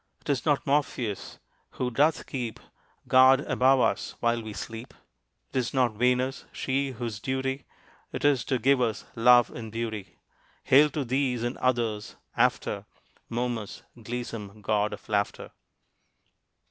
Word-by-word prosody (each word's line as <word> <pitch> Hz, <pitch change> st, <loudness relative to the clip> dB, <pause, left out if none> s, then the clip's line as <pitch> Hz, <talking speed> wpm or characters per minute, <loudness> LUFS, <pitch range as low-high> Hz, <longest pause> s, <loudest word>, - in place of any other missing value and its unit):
'Tis 140 Hz, -3 st, -1 dB
not 145 Hz, -2 st, +2 dB
Morpheus, 130 Hz, -7 st, -1 dB, 0.4 s
who 125 Hz, -1 st, -1 dB
doth 150 Hz, +6 st, +2 dB
keep 120 Hz, -4 st, -4 dB, 0.5 s
Guard 130 Hz, +1 st, +6 dB
above 130 Hz, -2 st, +3 dB
us -, -, 0 dB
while 115 Hz, 0 st, +1 dB
we 110 Hz, -1 st, -7 dB
sleep, 115 Hz, +4 st, -7 dB, 0.6 s
'Tis 130 Hz, 0 st, -1 dB
not 125 Hz, -4 st, +3 dB
Venus, 125 Hz, +4 st, +1 dB
she 135 Hz, +1 st, -1 dB
whose 115 Hz, -3 st, -5 dB
duty 130 Hz, +2 st, -2 dB, 0.5 s
'Tis 140 Hz, -5 st, +2 dB
to 130 Hz, -, +1 dB
give 130 Hz, +2 st, +3 dB
us 115 Hz, -3 st, -1 dB
love 120 Hz, +1 st, +6 dB
and 110 Hz, -2 st, -7 dB
beauty; 110 Hz, -5 st, -5 dB, 0.5 s
Hail 145 Hz, +3 st, +6 dB
to 145 Hz, -1 st, -3 dB
these, 125 Hz, -1 st, 0 dB
and 120 Hz, +2 st, -2 dB
others, 115 Hz, -4 st, -1 dB, 0.2 s
after -, -, +1 dB, 0.4 s
Momus, 120 Hz, -3 st, -3 dB
gleesome 115 Hz, -3 st, -6 dB
god 105 Hz, +1 st, +1 dB
of -, -, -9 dB
laughter. 100 Hz, -1 st, -1 dB
125 Hz, 130 wpm, -27 LUFS, 115-130 Hz, 0.6 s, Guard